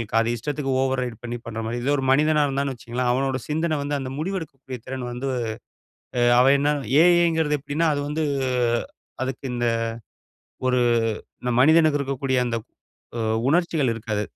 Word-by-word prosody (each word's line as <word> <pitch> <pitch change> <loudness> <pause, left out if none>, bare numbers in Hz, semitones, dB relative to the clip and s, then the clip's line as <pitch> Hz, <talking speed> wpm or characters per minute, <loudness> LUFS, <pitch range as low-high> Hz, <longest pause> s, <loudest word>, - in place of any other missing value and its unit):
இருக்கு. 115 0 0
அது 120 +1 0
இஷ்டத்துக்கு 140 +2 -3
ஓவர் 130 -1 0
ரைட் 120 -3 -7
பண்ணி 120 0 -4
பண்ற 115 0 -4
மாரி. 120 +2 -3
இதே 145 +3 +2
ஒரு 135 - -2
மனிதனா 150 +1 +3
இருந்தான்னு 135 0 -1
வச்சுக்குங்களேன், 120 +1 -2
அவனோட 130 0 0
சிந்தனை 155 0 0
வந்து 145 0 -1
அந்த 130 0 -5
முடிவெடுக்கக்கூடிய 155 -8 -5
திறன் 130 -1 -4
வந்து 130 +3 -4 1.1
அவன் 135 +2 +6
என்ன 145 +1 +2 0.3
ஏ. - - +7 0.2
ஐ. - - +3
ங்கிறது 150 -2 +1
எப்படின்னா, 150 +4 -1
அது 145 - -2
வந்து 155 +2 -1 1.0
அதுக்கு 130 +1 -3
இந்த 120 0 -1 1.0
ஒரு 125 -1 +3 0.6
இந்த 125 - -1
மனிதனுக்கு 155 +1 +5
இருக்கக்கூடிய 135 -1 -1
அந்த 115 -1 -1 0.6
உ - - -2 0.3
உணர்ச்சிகள் 160 -5 +2
இருக்காது. 105 -2 -3
135 Hz, 160 wpm, -24 LUFS, 125-150 Hz, 1.1 s, ஏ